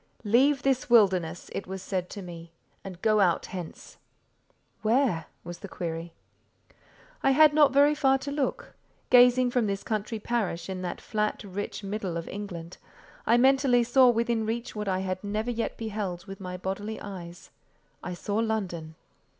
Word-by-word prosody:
"Leave 260 +6 +3
this 265 -2 +1
wilderness," 185 -7 +3
it - - -5
was 190 +1 -5
said 185 -1 -3
to 200 - -7
me, 170 -2 -10 0.3
"and 185 -2 -9
go 215 -1 +4
out 180 -4 +2
hence." 180 -4 -8 0.8
"Where?" 220 - +1 0.2
was 175 0 -8
the 200 - -8
query. 165 -2 -5 1.1
I - - +3
had 300 +2 +6
not 295 -2 +5
very 285 +2 +5
far 270 -2 +3
to 280 +1 -6
look; 280 -2 -2 0.4
gazing 250 0 +6
from 240 -3 +1
this 195 0 -3
country 215 +1 -2
parish 210 -6 -2
in 185 -1 -5
that 180 -1 -4
flat, 210 0 -2
rich 205 +1 -5
middle 195 -4 -3
of 165 - -5
England—I 200 +3 -4
mentally 265 -1 +4
saw 250 +2 +5
within 235 -1 +1
reach 230 +2 -3
what 210 -1 -4
I 190 -1 0
had 185 0 -3
never 215 +4 -2
yet 230 -1 -3
beheld 205 -6 -4
with 195 -2 -9
my 180 -1 -6
bodily 200 +4 -4
eyes: 180 -4 -9 0.5
I 180 - -5
saw 205 +3 -3
London. 190 -8 -2
210 Hz, 160 wpm, -27 LUFS, 185-240 Hz, 1.1 s, had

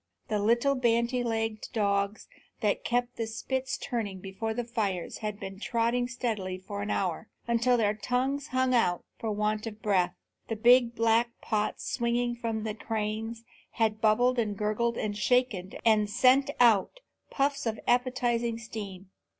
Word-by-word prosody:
The 210 -1 +1
little 235 +6 +3
bandy 240 -1 +1
legged 225 -2 -2
dogs 200 -1 0 0.3
that 210 -2 +1
kept 245 +1 -1
the 225 - -2
spits 260 +4 -3
turning 215 -7 -3
before 195 +4 -4
the 240 +2 -2
fires 205 -6 -2
had 210 -2 -4
been 195 0 -7
trotting 235 +2 0
steadily 220 -7 -3
for 200 +2 -7
many 205 +1 -2
an - - +1
hour, 190 +2 -2 0.2
until 235 +1 +3
their 210 -2 +2
tongues 255 +6 -1
hung 255 0 +1
out 180 -8 +2
for 225 - -3
want 210 +1 -1
of 215 -1 -7
breath. 185 -4 +1 0.3
The 225 - -2
big 240 +1 +5
black 230 +1 +3
pots 210 -1 -2
swinging 240 0 0
from 225 -2 -3
the 215 -1 -2
cranes 220 +1 -3 0.3
had 220 -1 0
bubbled 240 +3 +3
and 210 -3 -1
gurgled 215 +3 0
and 210 -1 -2
shaken 210 -3 +1
and 215 -2 +4
sent 260 +6 +4
out 235 - +4 0.3
puffs 280 -2 0
of 225 0 -2
appetizing 240 -2 +1
steam. 200 -4 -8
225 Hz, 160 wpm, -29 LUFS, 210-245 Hz, 0.3 s, big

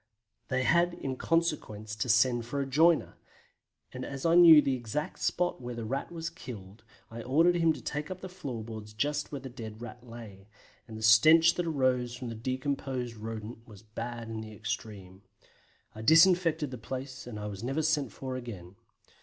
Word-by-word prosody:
They 130 -1 0
had 170 +4 +3
in 135 -1 -4
consequence 130 -11 -1
to 115 +4 -2
send 120 +1 +3
for 140 +4 -3
a 140 - 0
joiner; 155 +5 +3 0.7
and 130 0 -6
as 135 +2 -6
I 165 - +4
knew 170 -3 +9
the 140 -2 +1
exact 125 +4 -4
spot 175 -6 -1
where 120 0 -6
the 115 -1 -5
Rat 135 +8 -3
was 165 0 -5
killed 110 - -10 0.3
I 115 +1 -7
ordered 160 +9 +3
him 165 -1 +4
to - - -10
take 150 +1 -4
up 185 0 -7
the 185 - -6
floor 140 -12 -6
boards 110 -1 -9
just 145 +6 -2
where 140 -2 -5
the 135 - -7
dead 110 -4 -9
Rat 120 +1 -9
lay, 110 -5 -11 0.4
and 110 - -8
the 110 - -7
stench 155 +10 +7
that 175 -1 -2
arose 130 -5 0
from 125 -1 -6
the - - -5
decomposed 130 0 -3
Rodent 115 +1 -7
was 105 -3 -14
bad 115 +2 -6
in 110 -1 -5
the 110 0 -9
extreme. 105 -3 -6 0.7
I 110 - -9
disinfected 165 +1 +4
the 125 - -7
place, 130 +2 -7
and 110 -3 -7
I 105 - -5
was 105 0 -6
never 135 +6 -1
sent 145 -6 +1
for 130 +4 -6
again. 100 -7 -8
125 Hz, 190 wpm, -29 LUFS, 110-150 Hz, 0.7 s, knew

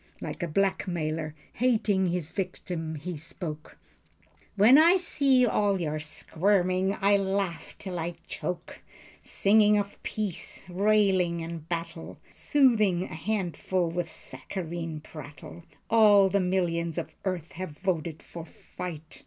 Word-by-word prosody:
Like - - -6
a 175 - -1
black 195 +4 0
mailer 155 -3 -2 0.2
hating 215 -6 +2
his 170 -3 -2
victim 175 -4 -4
he 165 +4 -5
spoke: 155 0 -7 0.8
"When 225 +8 +7
I 340 +4 +7
see 275 -7 +3
all 205 -4 +2
your 155 -2 -2
squirming 185 +4 0
I 200 0 +4
laugh 195 -3 -2
till 180 -3 -5
I 170 +1 -3
choke 175 -1 -5 0.4
Singing 210 +1 +4
of 205 0 -3
peace. 210 -5 -4
Railing 185 -3 +2
at 165 -1 -7
battle. 165 -1 -5
Soothing 215 -11 +3
a - - -6
handful 180 -1 -1
with 170 -1 -3
saccharine 165 -2 -5
prattle. 155 +2 -11 0.2
All 210 -4 +6
the 200 +2 +2
millions 170 -3 0
of 160 - -4
earth 180 -4 -3
have 165 -4 -7
voted 170 -4 -2
for 170 - -8
fight. 160 -1 -9
180 Hz, 130 wpm, -28 LUFS, 165-200 Hz, 0.8 s, When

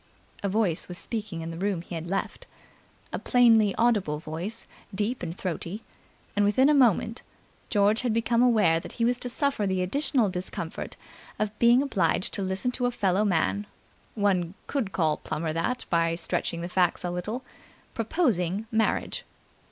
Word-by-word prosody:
A 200 - -1
voice 190 -5 +1
was 180 - -5
speaking 215 -7 -4
in 165 +1 -5
the 165 - -7
room 195 -3 -1
he 175 - -10
had 165 0 -5
left, 195 +1 -3 0.7
a - - -1
plainly 225 -5 +4
audible 210 -10 +2
voice, 165 +9 -5 0.3
deep 215 +5 -1
and 170 +1 -5
throaty; 185 +3 -4 0.5
and 205 - +3
within 260 +7 +4
a - - +5
minute 235 -4 +3 0.5
George 205 +1 +3
had 250 -2 0
become 230 +1 +2
aware 215 -10 +4
that - - -9
he 230 - 0
was 245 +1 +1
to 250 - -2
suffer 275 -5 0
the 190 -1 0
additional 265 +2 +1
discomfort 180 -3 -3 0.4
of 215 -1 -1
being 240 +3 +6
obliged 200 -8 0
to - - -2
listen 190 +6 -1
to 245 0 0
a - - +2
fellow 195 -3 +1
man 200 +2 +1 0.5
one 190 -4 +1
could 250 -9 -2
call 160 -5 +1
Plummer 155 +1 -3
that 245 +10 -1
by 165 -1 +2
stretching 170 0 -2
the 170 - -3
facts 180 -1 +1
a 175 - -2
little 210 +9 -4 0.5
proposing 215 - 0
marriage. 225 0 0
205 Hz, 165 wpm, -27 LUFS, 175-230 Hz, 0.7 s, being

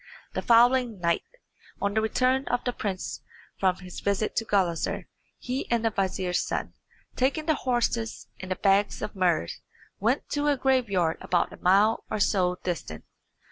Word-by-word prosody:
The - - -2
following 240 -2 +4
night, 170 -1 +1 0.6
on 200 0 0
the 220 - +2
return 255 +4 +1
of 245 - 0
the 245 - -1
prince 195 -5 -4 0.4
from 185 -2 +3
his 180 -1 -9
visit 200 +1 -1
to 225 - +1
Gulizar, 185 -6 0 0.3
he 255 +2 -4
and 235 -1 +1
the 225 - +2
vizier's 185 -2 0
son, - - -3 0.4
taking 280 +5 0
the 315 - +3
horses 240 -4 -1
and 185 -1 -4
bags 200 +1 +3
of - - -4
muhrs, 175 - 0 0.4
went 235 +7 +1
to 290 0 0
a 290 -1 +3
graveyard 230 -11 +1
about 175 -1 0
a - - -11
mile 200 +5 +3
or 215 - -2
so 180 -3 +2
distant. 165 - -4
210 Hz, 160 wpm, -27 LUFS, 185-245 Hz, 0.6 s, following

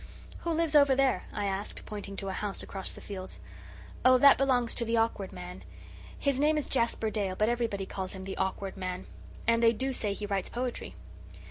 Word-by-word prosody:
"Who 340 - -4
lives 325 -1 +1
over 280 -3 +6
there?" 260 -8 +2
I 205 - -2
asked, 195 +1 -3
pointing 205 -2 -6
to 195 - -3
a - - -2
house 205 0 -2
across 195 -1 -3
the - - -11
fields. 190 -2 -7 0.6
"Oh, 255 0 +7
that 280 +2 +8
belongs 250 -4 +2
to 235 - -1
the 230 0 0
Awkward 225 -4 0
Man. 90 +1 -8 0.5
His 275 -2 +1
name 305 +2 +3
is 300 - -1
Jasper 230 -3 +1
Dale, 200 -4 -1
but 215 +3 +2
everybody 230 -5 -1
calls 190 -1 -5
him 190 -1 -7
the 190 0 -5
Awkward 190 0 -2
Man. 185 -1 -4 0.4
And 230 0 +3
they 230 0 +6
do 265 +3 -2
say 210 -5 0
he 205 - -5
writes 195 -2 -1
poetry. 245 0 -4
215 Hz, 205 wpm, -30 LUFS, 195-255 Hz, 0.6 s, that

